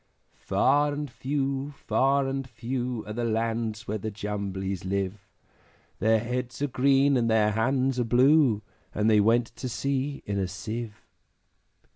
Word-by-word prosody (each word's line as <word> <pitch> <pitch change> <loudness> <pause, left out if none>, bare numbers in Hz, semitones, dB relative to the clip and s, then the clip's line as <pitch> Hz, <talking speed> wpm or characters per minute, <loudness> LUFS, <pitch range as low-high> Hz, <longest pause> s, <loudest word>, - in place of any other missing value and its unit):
Far 145 +2 +2
and 145 -2 -4
few, 140 +1 -2
far 135 +1 +2
and 135 -1 -3
few, 120 -1 -3
Are 105 - -6
the 120 +2 -2
lands 115 -1 -1
where 110 +1 -2
the 110 - -3
Jumblies 100 -3 -4
live; 100 +1 -2 0.8
Their 110 +1 +4
heads 125 +2 -3
are - - +2
green, 135 +1 +3
and 115 -1 +1
their 110 -1 +3
hands 130 +4 +1
are - - +2
blue, 125 -1 +4 0.3
And 105 +1 +1
they 110 -1 +5
went 115 +2 +2
to 130 - -4
sea 140 +4 -2
in 100 -1 -2
a 95 - 0
Sieve. 105 +4 -6
120 Hz, 150 wpm, -27 LUFS, 105-135 Hz, 0.8 s, they